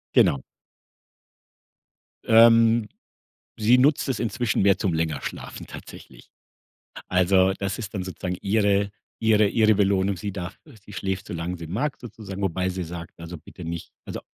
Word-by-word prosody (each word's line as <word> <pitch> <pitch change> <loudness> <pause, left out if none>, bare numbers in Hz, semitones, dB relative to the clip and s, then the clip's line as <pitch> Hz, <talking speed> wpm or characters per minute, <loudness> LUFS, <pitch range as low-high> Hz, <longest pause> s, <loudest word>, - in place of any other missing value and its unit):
Genau. 70 - +4 1.8
Ähm, 115 0 +6 0.7
sie 115 +4 +5
nutzt 140 +2 +3
es 125 - -1
inzwischen 115 -2 0
mehr 100 0 +4
zum 95 -4 0
länger 80 -3 -1
schlafen - - -7
tatsächlich. - - -12 0.8
Also, 95 +1 +4
das 100 0 -3
ist 105 -4 -6
dann 95 - -2
sozusagen 90 -1 -4
ihre 100 -1 +2 0.3
ihre 110 -2 +4
ihre 110 0 +4
Belohnung. 100 -1 +2
Sie 100 +3 -5
darf 95 0 -6 0.3
sie 105 - -13
schläft 95 -1 -3
so - - -6
lang 85 +2 -3
sie 85 -1 -8
mag 135 - -2
sozusagen, 105 -4 -8
wobei 95 0 0
sie 95 -1 -3
sagt: 85 0 -9
„Also, 85 +1 -7
bitte 85 - -12
nicht 85 0 -6
also, - - -6
100 Hz, 150 wpm, -24 LUFS, 90-110 Hz, 1.8 s, Ähm